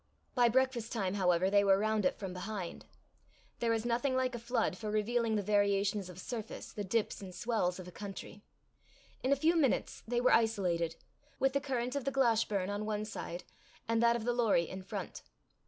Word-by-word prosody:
By 245 -2 +4
breakfast 255 -2 +1
time, 195 -5 -1
however, 185 -1 +2
they 200 0 +5
were 195 -1 +5
round 215 +2 +1
it 275 - +1
from 195 -3 -5
behind. 185 -1 -5 0.7
There 235 -1 +1
is 225 0 0
nothing 245 +3 +1
like 260 0 +1
a 240 - -4
flood 240 +2 0
for 215 -2 -5
revealing 220 +2 +1
the 205 - 0
variations 200 -1 +1
of 180 - -10
surface, 225 +1 -6
the 205 - -4
dips 210 +3 -1
and 185 -2 -8
swells 185 -5 0
of 185 -1 -8
a - - -9
country. 200 +1 -8 0.8
In 260 - 0
a - - +6
few 320 +5 +3
minutes 290 -6 +1
they 240 +1 +1
were 245 - +4
isolated, 180 -7 +2 0.4
with 270 0 +2
the 280 - +1
current 255 -2 -2
of 280 - -2
the 275 - +1
Glashburn 225 -7 +2
on 205 +1 -3
one 215 0 -1
side, 180 -5 -6 0.4
and 230 0 +2
that 235 0 +5
of 235 - -3
the 245 - +2
Lorrie 220 -8 +3
in 190 - -6
front. 190 -1 -6
220 Hz, 200 wpm, -33 LUFS, 195-240 Hz, 0.8 s, a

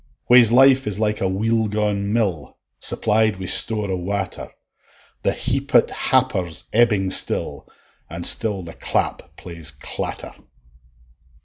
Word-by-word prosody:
Whase 120 -3 +6
life 135 +1 +3
is 100 -2 -4
like 105 0 -3
a 95 - -1
weel 110 +3 -2
gaun 105 -1 -3
mill, 95 - -4 0.2
Supplied 110 -2 +1
wi' 95 - -7
store 105 +1 +4
o' - - -2
water; 95 +2 -6 0.7
The - - -1
heaped - - -1
happer's 85 -3 -2
ebbing 105 -5 +1
still, - - +2 0.4
An' 85 +2 -8
still 105 -2 +5
the 85 -1 -11
clap - - -4
plays 85 -3 -6
clatter. 70 -1 -6
100 Hz, 125 wpm, -19 LUFS, 95-110 Hz, 0.7 s, Whase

